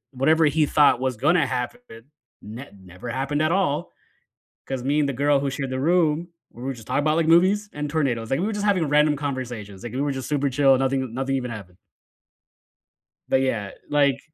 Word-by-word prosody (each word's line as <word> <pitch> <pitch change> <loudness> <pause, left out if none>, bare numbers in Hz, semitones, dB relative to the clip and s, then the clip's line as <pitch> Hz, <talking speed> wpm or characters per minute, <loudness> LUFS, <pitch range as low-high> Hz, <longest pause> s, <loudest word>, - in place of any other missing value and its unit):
whatever 155 +5 +3
he 150 +1 +2
thought 145 -5 +4
was 130 -3 -2
gonna 155 +4 +3
happen 125 -2 -3 0.6
ne 120 +7 -9 0.2
never 95 +7 -9
happened 135 +4 -2
at 155 +1 +2
all, 175 -3 0 0.8
'cause 130 -2 -4
me 145 +2 +1
and 140 - +1
the - - -1
girl 140 +2 +2
who 140 - -1
shared 135 -1 -4
the 130 0 -2
room, 165 +1 +2 0.2
we 120 - -12
were 135 +1 -2
just 115 -3 -12
talking - - 0
about, 155 +2 +1
like, 165 -1 +1
movies 190 +5 +4
and 150 0 -4
tornadoes- 125 -8 -1
like, 135 - +1
we 195 - 0
were 220 - -2
just 205 0 -3
having 190 -5 +2
a - - -2
random 150 0 +3
conversations, 125 -8 -5
like, 120 - -7
we 130 - -3
were 145 -1 0
just 130 -1 -5
super 145 -1 0
chill, 135 0 +4
nothing 135 -2 -1
nothing 135 +1 -2
even 125 -2 -3
happened. 95 -5 -9 1.5
But 130 - +2
yeah, 110 -7 -1 0.2
like 140 -2 +2
140 Hz, 210 wpm, -23 LUFS, 130-155 Hz, 1.5 s, thought